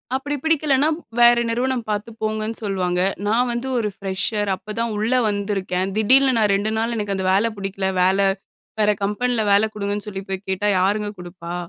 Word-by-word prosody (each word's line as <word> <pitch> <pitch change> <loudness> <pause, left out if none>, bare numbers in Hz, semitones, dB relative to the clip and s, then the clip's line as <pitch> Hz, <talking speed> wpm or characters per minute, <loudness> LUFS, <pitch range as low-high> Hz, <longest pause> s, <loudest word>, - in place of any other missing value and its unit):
அப்டி 285 +2 -2
பிடிக்கலன்னா 305 -3 +2 0.3
வேற 240 0 +7
நிறுவனம் 245 +1 0
பார்த்து 210 +1 -2
போங்கன்னு 215 +1 -2
சொல்லுவாங்க. 180 -3 -1 0.3
நான் 240 +4 +2
வந்து 240 +2 -3
ஒரு 220 -3 0
ஃப்ரெஷர். 200 +2 -2
அப்ப 210 +3 -9
தான் 230 -1 -1
உள்ள 220 +4 0 0.2
வந்திருக்கேன். 195 -2 -2
திடீல்னு 260 +4 +4
நான் 210 -2 +3
2 205 +2 -1
நாள் 230 +1 -1
எனக்கு 205 -2 -2
அந்த 190 -1 -2
வேல 210 +4 +3
பிடிக்கல. 195 -1 -2
வேல 190 +2 +3 0.6
வேற 210 0 +4
கம்பெனில 235 +4 0
வேலை 200 +2 +5
குடுங்கன்னு 205 0 -3
சொல்லி 195 -2 -5
போய் 190 +1 -5
கேட்டா 190 +2 -1
யாருங்க 205 +3 +1
குடுப்பா? 175 -1 -8
210 Hz, 170 wpm, -21 LUFS, 195-235 Hz, 0.6 s, வேற